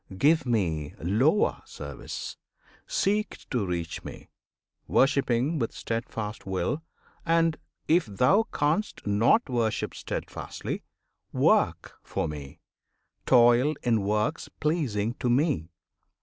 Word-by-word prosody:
give 150 +4 +3
Me 80 -11 0
lower 125 - +2
service! - - -7 0.5
seek 215 - -1
To 125 -5 +1
reach 85 -2 -3
Me, - - -10 0.6
worshipping 135 +2 +2
with 115 - -1
steadfast 110 -2 -4
will; 95 - -1 0.4
And, 165 -1 +3 0.3
if 165 -3 +3
thou 125 - +3
canst 155 +9 0
not 110 - +3
worship 120 -4 -1
steadfastly, - - -5 0.5
Work - - +2
for - - -2
Me, 75 -3 -8 0.7
toil 125 +4 +5
in 115 -4 +2
works 105 +2 -1
pleasing 120 -9 0
to 125 - 0
Me! 120 - +1
120 Hz, 105 wpm, -27 LUFS, 105-155 Hz, 0.7 s, toil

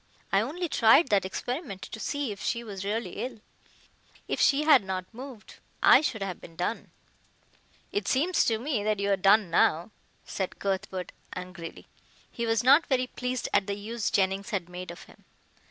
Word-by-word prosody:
I 195 - +4
only 330 +10 -3
tried 265 +2 +5
that 200 -2 +3
experiment 245 - -4
to - - -8
see 285 0 -2
if 200 - -8
she 235 - -1
was 200 -4 -7
really 215 +4 -3
ill. 250 -3 -6 0.9
If - - -1
she 285 +1 +4
had 300 -7 +6
not 190 -1 -3
moved 250 -2 -10 0.3
I - - +8
should 220 -9 -2
have 185 -3 -5
been 165 - -12
done." 180 +7 -3 1.0
"It 410 - -2
seems 325 +8 +2
to 225 - +2
me 240 -2 -2
that 215 -1 0
you 200 0 0
are - - +5
done 195 0 +4
now," 170 +3 +2 0.3
said 190 -2 -4
Cuthbert 190 -2 -3 0.2
angrily. 180 -2 -8 0.5
He 235 -1 -3
was 225 -1 +2
not 280 +6 +6
very 255 -2 +1
pleased 250 -1 -3
at 195 - +3
the 200 - -1
use 215 +2 -3
Jennings 195 0 0
had 185 -4 -3
made 180 0 -7
of 170 - -9
him. - - -19
215 Hz, 180 wpm, -28 LUFS, 190-255 Hz, 1.0 s, I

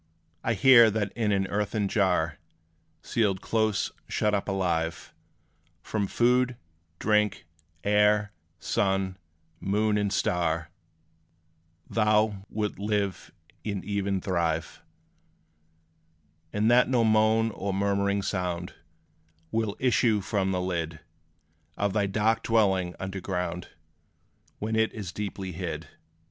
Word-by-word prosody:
I - - +1
hear 120 -4 +7
that 105 -2 -1
in 110 -3 0
an 95 -1 +2
earthen 105 +1 -1
jar 90 -6 +1 0.6
Sealed 100 -5 +1
close, 110 -1 0 0.2
shut 105 0 +1
up 100 - 0
alive, 85 -4 -1 0.7
From 105 -2 -1
food, 125 +2 +2 0.4
drink, 105 0 +1 0.4
air, 105 0 +3 0.3
sun, 95 -1 0 0.4
moon 105 +2 +1
and 100 -1 0
star, 85 -3 0 1.2
Thou 105 -2 +1
'lt 105 -2 -3
live 100 -2 -2 0.3
and 100 -3 -4
even 100 -1 -1
thrive: 85 -4 -1 1.7
And 110 +3 +2
that 125 +1 +5
no 125 -3 +3
moan, 110 +1 +3
or 100 -1 -3
murmuring 100 0 0
sound 90 -2 -2 0.8
Will 110 -2 -1
issue 120 -4 +3
from 95 -1 -1
the 90 -1 0
lid 85 -3 -3 0.8
Of 100 -1 0
thy 105 -2 +1
dark 110 +3 +1
dwelling 95 -6 +2
under 95 0 -5
ground, 90 -1 -3 0.9
When 110 +1 -2
it 110 0 +2
is 100 -5 -6
deeply 100 -1 -5
hid. 80 -3 -5
100 Hz, 110 wpm, -27 LUFS, 95-110 Hz, 1.7 s, hear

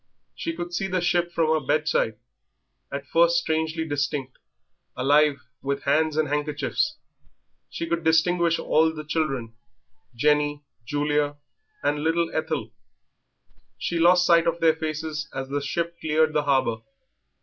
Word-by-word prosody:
She 330 0 -4
could 175 - -6
see 195 +2 -1
the 185 -1 0
ship 175 0 +1
from 165 -2 +1
her 155 -2 0
bedside, 145 -6 +1 0.7
at 140 0 -5
first 170 +4 +3
strangely 160 0 -1
distinct, 145 -3 -3 0.6
alive 145 +1 +3 0.2
with 140 0 -2
hands 155 +2 +2
and 155 -1 +2
handkerchiefs; 150 - -1 0.7
she - - -4
could 165 0 -2
distinguish 165 +1 +3
all 160 +1 +2
the 155 -1 -7
children 135 -7 -2 0.6
Jenny, 150 +2 +1 0.2
Julia, 145 0 0 0.5
and 150 - +1
little 165 +1 +1
Ethel. 155 -8 -2 1.1
She 170 - -2
lost 180 +2 +5
sight 170 -1 +4
of 170 0 0
their 160 -1 +4
faces 155 0 -4
as 135 0 -4
the 145 +1 -1
ship 170 +4 -3
cleared 155 0 +2
the 150 -1 +1
harbour. 130 -5 +2
155 Hz, 140 wpm, -25 LUFS, 145-165 Hz, 1.1 s, lost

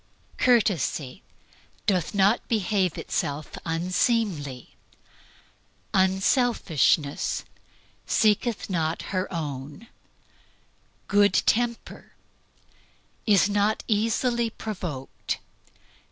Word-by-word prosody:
Courtesy 190 - +1 0.6
"Doth 190 -2 0
not 200 +4 +3
behave 200 -5 0
itself 145 +1 -3 0.2
unseemly." 170 - -1 1.2
Unselfishness 190 - +2 0.6
"Seeketh 215 +1 +2
not 165 -3 -1
its 185 0 0
own." 145 - -5 1.2
Good 205 0 +4
temper 235 0 -1 1.1
"Is 205 -2 +5
not 205 +1 +1 0.7
provoked." 180 -11 -5
190 Hz, 60 wpm, -26 LUFS, 155-215 Hz, 1.2 s, Is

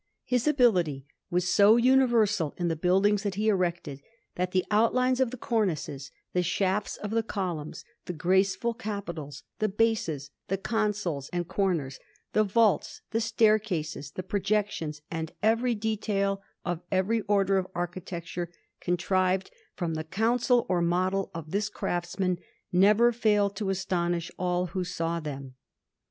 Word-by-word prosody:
His 250 +2 0
ability 180 - +3 0.2
was 180 +1 +1
so 210 +2 +7
universal 235 - +3
in 175 -1 0
the 165 - 0
buildings 195 +5 +3
that 200 -3 -2
he 215 +2 +1
erected, 170 -8 -1 0.3
that 180 0 -1
the 185 0 +1
outlines 250 +4 +3
of 260 -2 +3
the 255 - -7
cornices, 175 - -1 0.2
the 180 - +2
shafts 190 +3 0
of 210 - -5
the 230 +1 +2
columns, 180 -8 -4 0.2
the 180 - -4
graceful 190 +6 +1
capitals, 175 - -6 0.2
the 215 - +1
bases, 190 -10 0 0.2
the 195 - 0
consoles 210 - -1
and 175 -1 -2
corners, 170 -10 -1 0.3
the 215 - +4
vaults, 215 0 +2
the 225 +1 +1
staircases, 215 - +1
the 185 - -5
projections, 195 -6 -1
and 160 -1 -4
every 230 +2 +3
detail 205 -2 -1 0.2
of 175 -2 -2
every 200 +4 +1
Order 195 -1 +3
of 185 - -4
architecture, 175 -1 -4 0.3
contrived 185 +1 0 0.2
from 170 -4 -2
the 155 0 -3
counsel 235 +7 +2
or 180 -2 +1
model 185 +3 +1
of 160 -2 -7
this 205 +1 0
craftsman, 180 -1 -2 0.3
never 210 +6 +5
failed 210 -3 +2
to 205 -2 -2
astonish 175 -3 -1
all 180 0 0
who 185 - -1
saw 170 -2 -2
them. 140 -4 -6
190 Hz, 145 wpm, -28 LUFS, 175-215 Hz, 0.3 s, so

